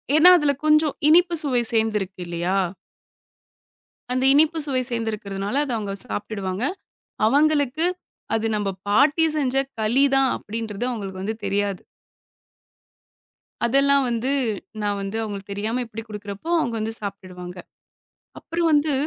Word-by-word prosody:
ஏன்னா 340 +4 +8
அதுல 295 -3 +2
கொஞ்சம் 305 -1 +4
இனிப்பு 345 +1 +5
சுவை 250 -4 +1
சேர்ந்துருக்கு 210 -4 0
இல்லையா? 175 +3 -1 1.6
அந்த 255 +1 0
இனிப்பு 315 +3 +4
சுவை 260 -2 0
சேர்ந்துருக்கறதுனால 215 +1 -2
அத 260 - -4
அவங்க 205 -2 -3
சாப்ட்டிடுவாங்க. 190 - -4 0.6
அவங்களுக்கு, 295 +2 +2 0.5
அது 225 0 -1
நம்ம 205 -1 -1 0.2
பாட்டி 285 +9 +4
செஞ்ச 270 -2 0 0.2
களி 235 +6 +3
தான் 270 -1 +4
அப்டின்றது 220 +1 -5
அவங்களுக்கு 195 -5 -5
வந்து 220 +2 -2
தெரியாது. 200 -1 -1 1.9
அதெல்லாம் 275 +2 +4
வந்து 235 +3 -1 0.5
நான் 205 -1 -1
வந்து 195 +3 -4
அவங்களுக்கு 200 -2 -6
தெரியாம 220 +5 -2
இப்படி 225 0 -7
குடுக்கறப்போ 205 +6 -7
அவங்க 235 -4 -2
வந்து 220 +1 -2
சாப்ட்டிடுவாங்க. 185 -3 -7 0.8
அப்புறம் 335 0 -1
வந்து 295 0 +3
225 Hz, 120 wpm, -23 LUFS, 200-280 Hz, 1.9 s, ஏன்னா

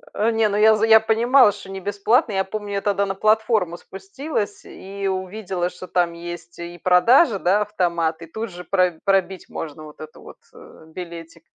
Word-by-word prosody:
Не, 225 0 +1
ну, 205 - -1
я 220 +1 +6
за 215 +1 +1
я 220 0 +7
понимала, 230 +2 +4
что 200 -1 -12
не 195 - -6
бесплатно. 205 +5 +1
Я 190 0 +1
помню, 205 +1 -6
я 200 - -1
тогда 200 -1 0
на 195 - -4
платформу 215 -4 +1
спустилась 200 - -5
и 195 +1 -7
увидела, 185 -1 -3
что 180 +1 -11
там 175 -2 0
есть 170 0 -9
и 170 0 -8
продажа, 205 - +4
да, 195 +4 +2
автомат, 170 -5 -1
и - - -8
тут 220 +7 -6
же 180 0 -10
про 180 -2 0
пробить 190 -2 0
можно 155 -1 -7
вот 150 -1 -13
этот 155 0 -10
вот, - - -13 0.2
э, 455 - -16
билетик. 170 -1 -10
195 Hz, 185 wpm, -21 LUFS, 175-215 Hz, 0.2 s, я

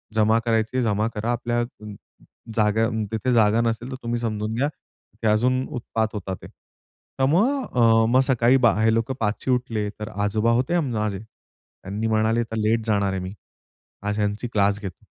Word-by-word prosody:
जमा 110 +1 +4
करायचीये 115 +2 +1
जमा 105 0 +1
करा 110 +3 -1
आपल्या 120 0 -1
अ, 120 -3 -8 0.7
जागा 110 +1 +2 0.2
तिथे 125 +3 0
जागा 110 0 +4
नसेल 115 +2 -1
तर 130 - -5
तुम्ही 120 0 -2
समजून 110 -1 -2
घ्या. 140 +5 +1 0.5
की - - 0
अजून 125 +4 +2 0.2
उत्पात 110 -1 -1
होतात 95 -2 -4
ते. - - -9 0.7
तर 135 - +2
मग 240 - +2
अ, 115 -2 +5
मग 130 +1 +5
सकाळी 125 0 +4 0.3
हे 110 0 +4
लोक 115 +3 0
5ची 110 +4 -1
उठले 115 -4 0
तर 105 - -4 0.2
आजोबा 110 +3 +1
होते 130 +9 +1
माझे. 105 -8 -2
त्यांनी 110 -1 -9
म्हणाले, 110 +1 +2
"आता 115 -1 -4
लेट 110 +1 +1
जाणार 100 -2 +1
आहे 95 - -2
मी, 95 +1 -6 0.7
आज 105 +1 -2
ह्यांची 105 +3 -1
क्लास 100 0 +2
घेतो." 95 -3 -8
110 Hz, 170 wpm, -23 LUFS, 105-120 Hz, 0.7 s, अ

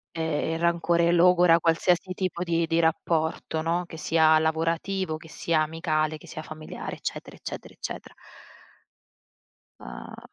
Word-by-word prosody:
E 165 - -2
e 160 0 -1
il 165 - -3
rancore 170 0 +2
logora 175 -1 +5
qualsiasi 175 +2 +2
tipo 185 -2 -2
di 170 -1 +1
di 165 +1 +1
rapporto, 160 -1 0
no, 170 +2 0
che 165 - -10
sia 160 0 +4
lavorativo, 165 +2 -1
che 160 0 -14
sia 165 -1 0
amicale, 155 -1 -1
che - - -16
sia 155 - -7
familiare, 155 0 -7
eccetera, - - -6
eccetera, - - -8
eccetera. - - -7 1.6
Ah - - -9
165 Hz, 140 wpm, -26 LUFS, 160-170 Hz, 1.6 s, logora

